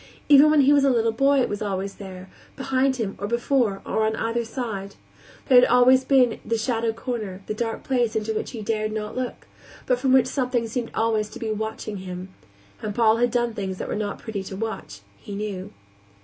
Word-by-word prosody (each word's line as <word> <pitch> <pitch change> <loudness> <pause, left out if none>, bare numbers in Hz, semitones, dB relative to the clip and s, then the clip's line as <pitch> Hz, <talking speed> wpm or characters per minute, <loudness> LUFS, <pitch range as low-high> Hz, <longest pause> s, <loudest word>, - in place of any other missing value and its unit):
Even 290 +1 +8
when 305 -1 +5
he 280 +2 +5
was 285 -1 +4
a 275 - +4
little 230 -3 +2
boy 275 +4 +3
it - - +1
was 205 - -4
always 195 -1 -2
there 190 -2 -10 0.3
behind 265 0 +1
him, 220 -6 -3
or 205 - -3
before, 235 -3 0
or 220 - 0
on 220 0 +1
either 230 +1 -1
side. 220 -5 -5 0.5
There 255 -3 +7
had 245 - +4
always 250 +2 +5
been 260 -3 +3
the 230 - -1
shadowed 225 -1 -1
corner, 215 -6 -5
the - - -3
dark 225 +1 -3
place 245 -4 0
into 220 0 -1
which - - -3
he 225 -4 -7
dared 215 0 -1
not 210 -1 -4
look, 255 -1 -4 0.4
but 250 -1 +1
from 260 0 +1
which 260 -2 +6
something 250 -3 -1
seemed 235 +1 -3
always 220 -2 +1
to 215 - -10
be 225 -1 -3
watching 215 -1 -4
him 185 0 -7 0.5
and 210 -1 -4
Paul 225 -1 +4
had 245 +1 +2
done 240 -1 0
things 190 -3 -4
that - - -5
were - - -3
not 205 -1 -3
pretty 220 -4 -5
to 190 - -7
watch, 205 - -5 0.2
he 200 - -8
knew. 200 -3 -5
225 Hz, 215 wpm, -24 LUFS, 210-250 Hz, 0.5 s, Even